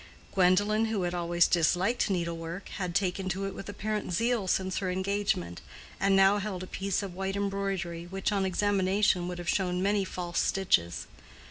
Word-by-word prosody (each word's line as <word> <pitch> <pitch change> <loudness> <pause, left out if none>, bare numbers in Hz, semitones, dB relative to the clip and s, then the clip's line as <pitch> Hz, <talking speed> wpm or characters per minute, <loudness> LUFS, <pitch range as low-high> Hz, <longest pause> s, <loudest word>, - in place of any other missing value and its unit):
Gwendolen, 205 +4 +3
who 220 -4 -1
had 175 0 -1
always 175 0 +2
disliked 180 +8 +2
needlework, 170 0 -3
had 180 -3 -3
taken 190 0 0
to 190 +2 -2
it 195 - -4
with 195 - -8
apparent 210 -2 -3
zeal 230 +1 +1
since 190 0 0
her 190 - -2
engagement, 190 - -1 0.4
and 195 0 +3
now 195 +1 +5
held 190 -3 -4
a - - -5
piece 195 +1 -2
of 195 -3 -6
white 195 +1 -3
embroidery 195 -4 -2
which, 190 +3 -2
on 200 -2 +1
examination, 190 -1 +2
would 180 0 -4
have 175 0 -7
shown 180 0 0
many 200 0 +2
false 175 -2 -3
stitches. 85 - +1
190 Hz, 170 wpm, -29 LUFS, 175-200 Hz, 0.4 s, now